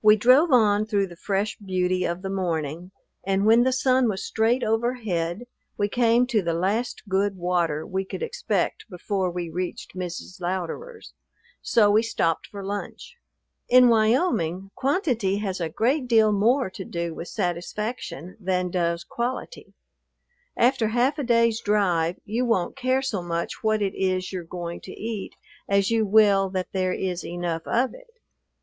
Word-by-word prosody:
We 215 0 +7
drove 255 +9 +5
on 215 -4 +4
through 205 -3 +1
the 175 -2 -11
fresh 200 +3 -2
beauty 185 -2 -1
of 170 +2 -3
the 190 - -3
morning, 170 -3 -2 0.3
and 195 +1 +1
when 225 +2 +6
the 260 +1 +3
sun 255 -1 +2
was 190 -2 -3
straight 230 +3 +1
overhead 220 -5 -1 0.3
we 205 0 0
came 240 +2 +3
to 235 -4 +1
the 170 -2 -1
last 200 +8 -1
good 195 0 0
water 175 -4 0
we 190 0 -2
could 195 - -6
expect 475 - -2
before 185 0 -2
we 175 -1 -4
reached 180 +2 -5
Mrs. 180 0 -6
Louderer's; 190 - -5 0.5
so 210 -3 +4
we 215 +2 +5
stopped 165 -8 -1
for 200 -1 -8
lunch. 205 +1 -6 0.5
In 250 0 +7
Wyoming 215 - +1
quantity 255 - 0
has 195 -3 -3
a 165 - -1
great 250 - 0
deal 220 -3 +4
more 220 +2 +2
to 190 - -7
do 170 -2 -4
with 170 - -7
satisfaction 180 - -4
than 180 -2 -1
does 170 -1 0
quality; 250 - -5 0.8
after 245 -2 +3
half 250 +7 +1
a - - -1
day's 230 -2 +2
drive 180 -5 +1
you 225 +4 -1
won't 230 -8 0
care 260 0 0
so 220 -9 -2
much 170 +3 -4
what 215 -1 +2
it 195 - -1
is 185 0 -1
you're 180 -2 -4
going 170 0 -6
to 185 - -9
eat 220 -2 -5 0.3
as 200 +1 +2
you 225 -2 +2
will 200 -2 +5
that 185 -1 -3
there 185 -1 0
is 180 -1 -3
enough 170 -2 -4
of 250 +2 +1
it. - - -15
200 Hz, 165 wpm, -25 LUFS, 180-235 Hz, 0.8 s, We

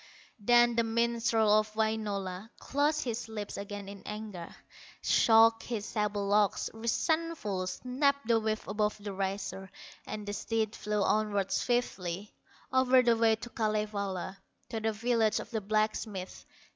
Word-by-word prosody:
Then 240 +2 +5
the 230 - +3
minstrel 230 -1 +2
of 215 0 -4
Wainola 210 -3 -2
Closed 295 +2 0
his 235 -2 -4
lips 210 -2 -5
again 200 0 -6
in 200 0 -9
anger, 210 -5 -6 0.6
Shook 225 0 +5
his 225 -4 -4
sable 210 -2 -1
locks, 205 0 +2
resentful, 230 - -1
Snapped 275 +5 0
the 230 -1 +4
whip 215 0 -2
above 210 +1 0
the 205 -1 -6
racer, 195 0 -3 0.4
And 210 -1 -5
the 205 - -3
steed 220 0 -1
flew 210 -1 -1
onward 205 -2 +1
swiftly, 205 -6 -1 0.4
O'er 260 0 +5
the 235 -1 +4
way 225 -1 +4
to 240 +2 -9
Kalevala, 210 -3 -2 0.3
To 225 - -3
the 220 0 0
village 225 0 +1
of - - -8
the 220 -2 -1
blacksmith. 215 -2 -2
215 Hz, 140 wpm, -31 LUFS, 205-230 Hz, 0.6 s, Then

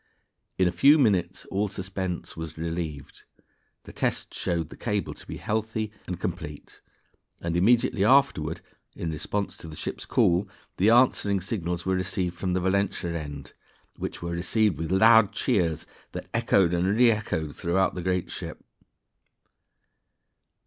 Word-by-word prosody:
In 95 - +4
a - - +1
few 140 - +6
minutes 95 - +1
all 100 +2 +1
suspense 95 -2 -4
was 80 -1 -7
relieved, 80 -3 -5 0.6
the - - -12
tests - - -2
showed 85 -3 -1
the - - -9
cable 105 -3 -2
to - - -14
be - - -6
healthy 110 0 -2 0.2
and 90 -1 -4
complete, 85 -5 -6 0.6
and 85 0 -3
immediately 100 +1 +3
afterward 105 - +3 0.3
(in 80 - -3
response 100 +6 -3
to - - -10
the 80 - -9
ship's - - -5
call) 90 +3 +2 0.3
the 100 +4 +4
answering 115 -4 +4
signals 90 -3 -3
were 95 - +1
received 90 -1 -1
from 90 0 -2
the 95 - +1
Valentia 95 -1 0
end, 75 -3 -7 0.4
which - - -6
were 85 - -3
received 95 +1 +1
with 80 +1 -3
loud 110 +2 +6
cheers 90 - 0 0.3
that - - -6
echoed 90 -3 +3
and 95 +4 +1
reechoed 105 -11 +2
throughout 95 +3 +1
the 90 - -4
great 90 0 -1
ship. - - -7
90 Hz, 145 wpm, -26 LUFS, 85-105 Hz, 0.6 s, few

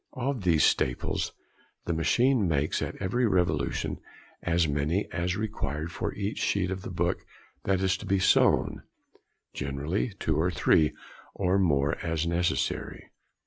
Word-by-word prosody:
Of 130 -1 -1
these 85 -5 +3
staples, 65 - +1 0.5
the 85 - 0
machine 120 +7 +2
makes 75 -2 0
at - - -3
every 120 +6 0
revolution 90 -6 0 0.4
as 85 -1 +2
many 75 +7 0
as 90 +1 -1
are - - -4
required 80 -8 -3
|32| - - -12
for 105 +3 -3
each 100 +1 -3
sheet 95 -2 0
of 95 0 -3
the - - -7
book 85 -1 -1 0.4
that 95 -1 +1
is 95 0 +2
being 95 +1 0
sewn—generally 75 - -1
two 80 -2 0
or 85 +3 +2
three, 75 -2 +3 0.4
or 95 0 +2
more, 75 -4 +2
as 80 -1 -1
necessary. 85 +1 -1
90 Hz, 145 wpm, -28 LUFS, 80-100 Hz, 0.5 s, these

